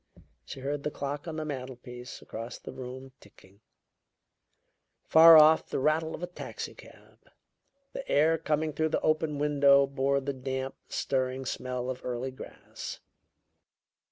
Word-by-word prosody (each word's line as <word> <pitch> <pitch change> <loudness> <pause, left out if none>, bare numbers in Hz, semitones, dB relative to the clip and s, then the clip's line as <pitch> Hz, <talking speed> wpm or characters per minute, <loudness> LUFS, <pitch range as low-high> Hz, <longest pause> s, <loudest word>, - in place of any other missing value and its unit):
She 135 - -9
heard 140 +2 -2
the 150 - -2
clock 145 +2 -5
on 160 - -4
the 155 -1 -3
mantelpiece 125 -3 -7
across 115 +2 -7
the - - -9
room 130 +1 -8
ticking; 100 0 -20 1.4
far 165 0 +9
off, 155 +1 +6
the - - -2
rattle 160 +3 +1
of 175 - -9
a - - -2
taxicab. 175 - -10 0.7
The 275 - -7
air 160 +3 +3
coming 155 -1 -1
through 160 +2 0
the - - 0
open 155 -1 +1
window 140 -1 +5
bore 140 0 0
the 140 +1 -3
damp, 130 0 -4 0.2
stirring 130 0 -1
smell 125 -1 -3
of 130 -1 -5
early 125 +1 -3
grass. 130 - -9
140 Hz, 140 wpm, -29 LUFS, 130-155 Hz, 1.4 s, far